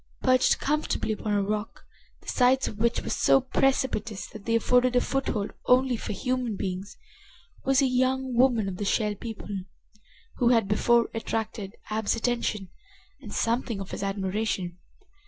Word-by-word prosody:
Perched 255 Hz, -1 st, +4 dB
comfortably 300 Hz, -6 st, -1 dB
upon 215 Hz, 0 st, -2 dB
a 200 Hz, -1 st, +2 dB
rock, 210 Hz, +2 st, -4 dB, 0.4 s
the -, -, -22 dB
sides 260 Hz, +1 st, +3 dB
of 210 Hz, -, -7 dB
which 235 Hz, +1 st, +1 dB
were -, -, -4 dB
so -, -, +4 dB
precipitous 260 Hz, -5 st, 0 dB
that 215 Hz, -3 st, -11 dB
they 230 Hz, -, +1 dB
afforded 250 Hz, +2 st, +3 dB
a -, -, +6 dB
foothold 245 Hz, -7 st, -2 dB
only 255 Hz, 0 st, +4 dB
for -, -, -5 dB
human 250 Hz, 0 st, -1 dB
beings, 190 Hz, +1 st, -5 dB, 0.7 s
was 270 Hz, +1 st, +4 dB
a -, -, +4 dB
young 260 Hz, 0 st, +1 dB
woman 240 Hz, -4 st, +3 dB
of 185 Hz, -2 st, -4 dB
the 205 Hz, -, -3 dB
Shell 210 Hz, +1 st, +1 dB
People 220 Hz, 0 st, -8 dB, 0.9 s
who 240 Hz, -2 st, +3 dB
had 230 Hz, -4 st, +3 dB
before 235 Hz, +3 st, +3 dB
attracted 220 Hz, -2 st, -4 dB, 0.2 s
Ab's 220 Hz, 0 st, 0 dB
attention 230 Hz, -5 st, -1 dB, 0.5 s
and -, -, -9 dB
something 230 Hz, -2 st, -1 dB
of 195 Hz, 0 st, -7 dB
his -, -, -5 dB
admiration. 195 Hz, -2 st, -2 dB
230 Hz, 155 wpm, -27 LUFS, 205-255 Hz, 0.9 s, a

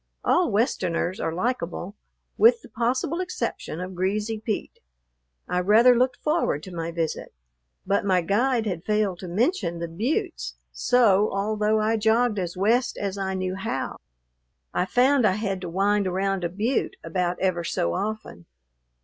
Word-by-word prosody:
All 355 Hz, -4 st, +3 dB
Westerners 185 Hz, -5 st, 0 dB
are 160 Hz, -, -1 dB
likable, 185 Hz, -1 st, -3 dB, 0.4 s
with 465 Hz, +1 st, +5 dB
the -, -, -13 dB
possible 250 Hz, +8 st, -1 dB
exception 355 Hz, -, -4 dB
of 185 Hz, +1 st, -5 dB
Greasy 205 Hz, +4 st, -1 dB
Pete. 215 Hz, -1 st, -4 dB, 0.7 s
I 180 Hz, -, 0 dB
rather 220 Hz, +7 st, +6 dB
looked 250 Hz, +2 st, +2 dB
forward 300 Hz, -, 0 dB
to 185 Hz, -, -9 dB
my 165 Hz, -1 st, -3 dB
visit. 165 Hz, -, -3 dB, 0.5 s
But 195 Hz, +1 st, +1 dB
my 185 Hz, -2 st, +2 dB
guide 235 Hz, +6 st, +1 dB
had 180 Hz, -5 st, -3 dB
failed 210 Hz, -4 st, 0 dB
to 185 Hz, -, -7 dB
mention 185 Hz, -, 0 dB
the 170 Hz, 0 st, -4 dB
buttes; 285 Hz, -, -2 dB, 0.2 s
so, 215 Hz, -5 st, +3 dB
although 210 Hz, +2 st, +1 dB
I 220 Hz, +1 st, +1 dB
jogged 220 Hz, 0 st, +2 dB
as 180 Hz, -1 st, -4 dB
west 230 Hz, +6 st, +2 dB
as 200 Hz, -1 st, -3 dB
I 190 Hz, -1 st, -2 dB
knew 185 Hz, 0 st, -2 dB
how, 190 Hz, -8 st, -3 dB, 0.8 s
I 180 Hz, -, +1 dB
found 255 Hz, +5 st, +3 dB
I 190 Hz, -, +2 dB
had 195 Hz, -2 st, -2 dB
to 180 Hz, -, -5 dB
wind 200 Hz, +3 st, +1 dB
around 190 Hz, 0 st, -1 dB
a 170 Hz, -, 0 dB
butte 215 Hz, +9 st, -1 dB
about 175 Hz, +1 st, -1 dB
ever 185 Hz, -2 st, 0 dB
so 85 Hz, -, -1 dB
often. 210 Hz, -, -4 dB
200 Hz, 160 wpm, -25 LUFS, 180-230 Hz, 0.8 s, rather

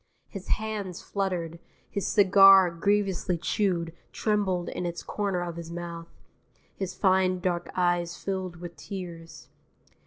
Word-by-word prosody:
His 195 Hz, -3 st, -8 dB
hands 210 Hz, -5 st, -3 dB
fluttered. 175 Hz, -4 st, -3 dB, 0.3 s
His 200 Hz, -, -3 dB
cigar, 195 Hz, -2 st, +7 dB
grievously 195 Hz, 0 st, 0 dB
chewed, 170 Hz, -2 st, -1 dB, 0.2 s
trembled 200 Hz, -5 st, 0 dB
in 180 Hz, -, -3 dB
its 170 Hz, 0 st, -5 dB
corner 200 Hz, -4 st, -2 dB
of 170 Hz, -1 st, -5 dB
his 170 Hz, -1 st, -7 dB
mouth. 170 Hz, -1 st, -6 dB, 0.7 s
His 185 Hz, -2 st, -4 dB
fine 185 Hz, -1 st, +2 dB
dark 175 Hz, -2 st, -2 dB
eyes 175 Hz, -1 st, +1 dB
filled 190 Hz, -2 st, -4 dB
with 170 Hz, 0 st, -9 dB
tears. 170 Hz, -1 st, -8 dB
180 Hz, 125 wpm, -27 LUFS, 170-195 Hz, 0.7 s, cigar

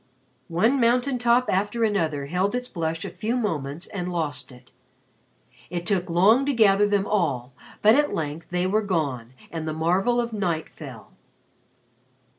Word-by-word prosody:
One 220 Hz, +11 st, +2 dB
mountain 250 Hz, +2 st, +2 dB
top 240 Hz, +1 st, +3 dB
after 205 Hz, +5 st, 0 dB
another 160 Hz, -10 st, 0 dB
held 185 Hz, +9 st, 0 dB
its 250 Hz, 0 st, -3 dB
blush 165 Hz, -5 st, -3 dB
a -, -, -5 dB
few 230 Hz, +4 st, -2 dB
moments 160 Hz, -, -3 dB
and 180 Hz, -2 st, -5 dB
lost 155 Hz, -5 st, -3 dB
it. 125 Hz, 0 st, -17 dB, 1.0 s
It 175 Hz, 0 st, -4 dB
took 185 Hz, -3 st, 0 dB
long 200 Hz, +10 st, +5 dB
to 285 Hz, -, +2 dB
gather 205 Hz, -3 st, +4 dB
them 205 Hz, -1 st, +1 dB
all 140 Hz, -12 st, -1 dB, 0.3 s
but 215 Hz, +1 st, +7 dB
at 295 Hz, +2 st, +3 dB
length 155 Hz, +1 st, -4 dB
they 180 Hz, 0 st, 0 dB
were 210 Hz, +4 st, +2 dB
gone 140 Hz, -, -2 dB, 0.2 s
and 160 Hz, -1 st, -4 dB
the 155 Hz, -, -2 dB
marvel 185 Hz, +9 st, +1 dB
of 235 Hz, -1 st, -2 dB
night 175 Hz, -6 st, -2 dB
fell. -, -, -11 dB
185 Hz, 160 wpm, -24 LUFS, 160-220 Hz, 1.0 s, but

